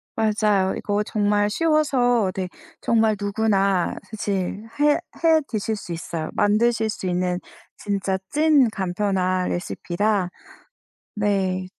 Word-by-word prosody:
맞아요. 210 Hz, -3 st, +2 dB
이거 205 Hz, 0 st, -1 dB
정말 205 Hz, -1 st, +1 dB
쉬워서 250 Hz, -, +2 dB
네 185 Hz, -1 st, -3 dB, 0.3 s
정말 220 Hz, -2 st, +3 dB
누구나 200 Hz, -3 st, +1 dB
사실 205 Hz, 0 st, -3 dB
해 295 Hz, 0 st, +5 dB, 0.3 s
해 320 Hz, -1 st, +5 dB
드실 220 Hz, 0 st, -2 dB
수 175 Hz, -4 st, -7 dB
있어요. 165 Hz, -1 st, -5 dB
만드실 220 Hz, +1 st, +2 dB
수 190 Hz, -3 st, -4 dB
있는 180 Hz, 0 st, 0 dB, 0.4 s
진짜 195 Hz, -2 st, -1 dB
찐 300 Hz, -4 st, +4 dB
간편한 185 Hz, -2 st, -1 dB
레시피라. 185 Hz, +2 st, -1 dB, 0.9 s
네. 190 Hz, -3 st, 0 dB
205 Hz, 220 characters per minute, -23 LUFS, 190-220 Hz, 0.9 s, 해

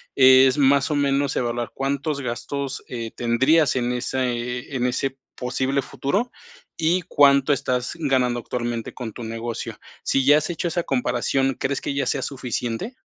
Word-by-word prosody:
es 130 Hz, 0 st, +7 dB
más 140 Hz, -1 st, +4 dB
o -, -, +1 dB
menos 140 Hz, -1 st, +1 dB
evaluar 120 Hz, -1 st, -2 dB
cuántos 140 Hz, +2 st, -2 dB
gastos, 135 Hz, +2 st, -4 dB
eh, 115 Hz, -2 st, -5 dB
tendrías 130 Hz, +6 st, +3 dB
en 125 Hz, -1 st, 0 dB
ese 125 Hz, 0 st, -2 dB
en 125 Hz, -1 st, 0 dB
ese 135 Hz, +2 st, -2 dB, 0.2 s
posible 130 Hz, +2 st, -1 dB
futuro, 200 Hz, -, -2 dB, 0.5 s
y 170 Hz, +3 st, +2 dB
cuánto 140 Hz, -4 st, +4 dB
estás 125 Hz, -2 st, -1 dB
ganando 130 Hz, -5 st, +1 dB
actualmente, 120 Hz, -1 st, -4 dB
con 120 Hz, -4 st, -6 dB
tu 120 Hz, -, -8 dB
negocio. 115 Hz, +1 st, -5 dB, 0.3 s
Sí 135 Hz, -, +1 dB
ya 145 Hz, +2 st, +7 dB
has 155 Hz, +3 st, -1 dB
hecho 175 Hz, 0 st, -2 dB
esa 175 Hz, +1 st, -1 dB
comparación, 135 Hz, 0 st, 0 dB
¿crees 135 Hz, +1 st, -1 dB
que -, -, -3 dB
ya 140 Hz, -1 st, 0 dB
sea 135 Hz, -, 0 dB
suficiente? 125 Hz, -, -4 dB
130 Hz, 155 wpm, -23 LUFS, 125-140 Hz, 0.5 s, es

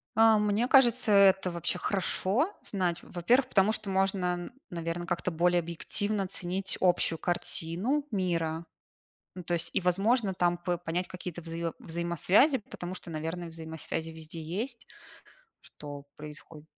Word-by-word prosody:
А, 225 Hz, 0 st, +6 dB
мне 210 Hz, +3 st, +2 dB
кажется, 250 Hz, -4 st, +5 dB
это 195 Hz, -2 st, +5 dB
вообще 170 Hz, +1 st, -2 dB
хорошо 205 Hz, -, +1 dB
знать. 180 Hz, -4 st, -1 dB
Во-первых, 240 Hz, +10 st, +2 dB
потому 200 Hz, -3 st, +3 dB
что 215 Hz, -2 st, -4 dB
можно, 190 Hz, -1 st, +1 dB
н 175 Hz, +5 st, -7 dB, 0.2 s
наверно, 170 Hz, 0 st, -3 dB
как-то 175 Hz, +1 st, -1 dB
более 175 Hz, +2 st, +3 dB
объективно 195 Hz, +5 st, -2 dB
оценить 185 Hz, 0 st, -3 dB
общую 175 Hz, -2 st, +3 dB
картину 180 Hz, -, -1 dB
мира. 170 Hz, -4 st, -1 dB, 0.7 s
Ну 180 Hz, -, -7 dB
то 175 Hz, -, -3 dB
есть, 170 Hz, -, 0 dB
и, 195 Hz, -, +2 dB
возможно, 195 Hz, +4 st, +2 dB
там 175 Hz, -1 st, +2 dB
п 175 Hz, 0 st, -2 dB
понять 175 Hz, +1 st, -2 dB
какие-то 180 Hz, -2 st, -7 dB
взаиво 165 Hz, 0 st, -4 dB
взаимосвязи, 170 Hz, -, +2 dB
потому 185 Hz, -4 st, -7 dB
что, 180 Hz, -, -8 dB
наверное, 165 Hz, +2 st, -4 dB
взаимосвязи 160 Hz, 0 st, -5 dB
везде 160 Hz, 0 st, -9 dB
есть, 225 Hz, +10 st, -4 dB, 0.8 s
что 145 Hz, -1 st, -10 dB
происходит. 150 Hz, +1 st, -10 dB
180 Hz, 140 wpm, -29 LUFS, 165-200 Hz, 0.8 s, А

